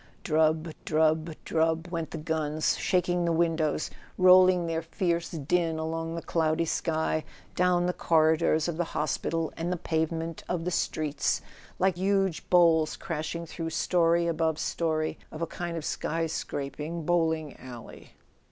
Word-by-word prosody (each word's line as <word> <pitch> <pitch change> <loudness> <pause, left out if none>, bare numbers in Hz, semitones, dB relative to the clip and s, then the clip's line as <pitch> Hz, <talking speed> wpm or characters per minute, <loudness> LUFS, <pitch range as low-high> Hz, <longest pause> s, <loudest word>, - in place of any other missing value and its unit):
Drub, 160 0 +1
drub, 160 +1 +1
drub, 165 +1 0
went 165 -3 -3
the 165 - -6
guns, 155 -1 0
shaking 180 -1 +1
the 170 - +1
windows, 160 -2 0 0.3
rolling 185 -1 +6
their 165 -1 -1
fierce 170 +1 -1
din 165 +1 0
along 165 +1 -3
the 170 - -5
cloudy 160 0 +1
sky, 160 -1 0 0.3
down 180 -1 +3
the 180 - 0
corridors 160 -1 +3
of 170 -2 -3
the 175 - +1
hospital 160 +1 -1
and 170 +2 -3
the 180 - -1
pave¬ 160 -1 0
ment 165 0 -5
of 170 -2 -2
the 180 - -1
streets, 155 -3 -1 0.3
like 185 -1 +2
huge 195 -3 0
bowls 165 -3 +4
crashing 170 0 -4
through 165 0 -5
story 170 0 +2
above 160 -1 0
story 160 -1 -1
of 155 +2 -5
a - - +2
kind 170 0 -5
of 160 - -5
sky 165 +1 -1
scraping 155 +1 -4
bowling 160 -3 +1
alley. 125 -2 -11
165 Hz, 150 wpm, -28 LUFS, 155-170 Hz, 0.3 s, rolling